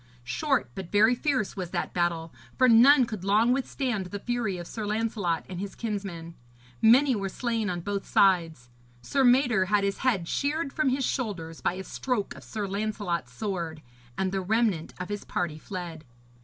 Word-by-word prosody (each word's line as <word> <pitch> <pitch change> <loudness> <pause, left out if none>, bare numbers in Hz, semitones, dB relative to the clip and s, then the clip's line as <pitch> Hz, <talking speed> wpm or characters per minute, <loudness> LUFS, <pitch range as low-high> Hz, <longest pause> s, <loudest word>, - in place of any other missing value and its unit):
Short 270 - 0
but 190 -3 -7
very 215 +4 +5
fierce 255 -4 -1
was 185 -3 -4
that - - -3
battle, 170 -2 -1 0.2
for 255 - +5
none 250 +3 +7
could 215 -5 -6
long 215 +5 +4
withstand 255 -6 -2
the 205 - -5
fury 225 -3 -2
of 175 - -6
Sir 220 +5 -6
Lancelot 210 -6 -1
and 180 -2 -6
his 200 0 -5
kinsmen. 195 -7 -5 0.5
Many 255 +4 +6
were 195 -2 -2
slain 230 0 -2
on 175 -1 -3
both 200 +2 -3
sides; 165 -10 +2 0.3
Sir 275 - +1
Mador 245 -5 +4
had 205 +1 +2
his 200 0 -1
head 215 -10 +1
sheared 285 - -1
from 305 -3 +1
his 265 0 0
shoulders 180 - -3
by - - +1
a 190 +1 -6
stroke 240 0 -2
of - - -13
Sir 215 -2 -4
Lancelot's 195 - -2
sword, 170 -1 -4 0.3
and 190 -1 0
the 195 0 -1
remnant 205 -4 0
of 180 - -5
his 205 -1 -4
party 165 -3 -3
fled. 175 -4 -7
205 Hz, 180 wpm, -27 LUFS, 180-240 Hz, 0.5 s, none